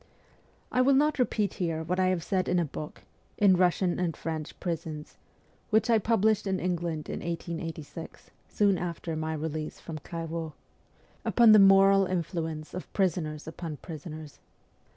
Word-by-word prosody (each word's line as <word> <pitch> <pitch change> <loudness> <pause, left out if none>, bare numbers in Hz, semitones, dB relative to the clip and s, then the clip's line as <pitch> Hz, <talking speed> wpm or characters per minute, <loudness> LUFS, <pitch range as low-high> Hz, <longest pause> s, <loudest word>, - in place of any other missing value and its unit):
I 255 - +3
will 270 +1 +5
not 295 +1 +2
repeat 215 -5 +1
here 165 -2 -1
what 180 +3 -1
I 185 - +3
have 185 -3 0
said 185 -1 0
in 180 - +2
a 170 - +2
book, 150 +1 -8 0.2
' - - -37
In 190 - +7
Russian 180 0 +2
and 175 -3 -1
French 160 -2 -5
Prisons,' 160 -3 -5 0.5
which 220 +2 +3
I 225 - +5
published 215 -1 +2
in 190 -1 0
England 170 -3 -2
in - - -4
1886, 165 -1 -6 0.2
soon 200 -3 +2
after 170 -1 -4
my 155 0 -2
release 155 0 -4
from 160 -2 -7
Clairvaux, 165 0 -5 0.7
upon 235 -2 +6
the 215 - +9
moral 195 0 +6
influence 165 -3 -3
of 180 - -7
prisoners 165 -6 -1
upon 160 -2 -6
prisoners. 155 -2 -9
170 Hz, 155 wpm, -28 LUFS, 160-195 Hz, 0.7 s, the